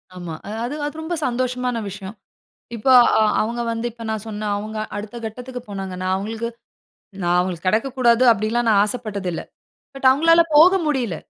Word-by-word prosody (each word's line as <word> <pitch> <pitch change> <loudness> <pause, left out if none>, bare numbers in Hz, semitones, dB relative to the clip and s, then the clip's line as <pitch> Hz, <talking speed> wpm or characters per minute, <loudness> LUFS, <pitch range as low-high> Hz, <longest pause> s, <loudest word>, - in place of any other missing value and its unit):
ஆமா, 175 -2 -7 0.3
அது 260 +5 -4
அது 295 - -5
ரொம்ப 320 +2 -4
சந்தோஷமான 250 0 -1
விஷயம். 195 +2 -8 0.6
இப்ப 225 +2 -6 0.3
அ - - +4 0.2
அவுங்க 235 +2 -2
வந்து 230 +1 -3
இப்ப 230 0 -11
நான் 220 -1 -2
சொன்ன, 215 -1 -4
அவுங்க 215 +1 -6 0.2
அடுத்த 210 +3 -6
கட்டத்துக்கு 250 +3 -7
போனாங்கனா, 190 -2 -5
அவுங்களுக்கு. 220 +4 -4 0.7
நான் 175 0 +2
அவுங்களுக்கு 180 0 -3
கிடைக்கக்கூடாது 240 +3 +2
அப்படிலாம் 225 +3 0
நான் 200 -2 +5
ஆசைப்பட்டதில்ல. 205 -6 -3 0.5
பட், 270 -1 -2
அவுங்களால 330 +5 +5
போக 335 +5 +8
முடியல. 250 - -1
225 Hz, 150 wpm, -21 LUFS, 200-250 Hz, 0.7 s, போக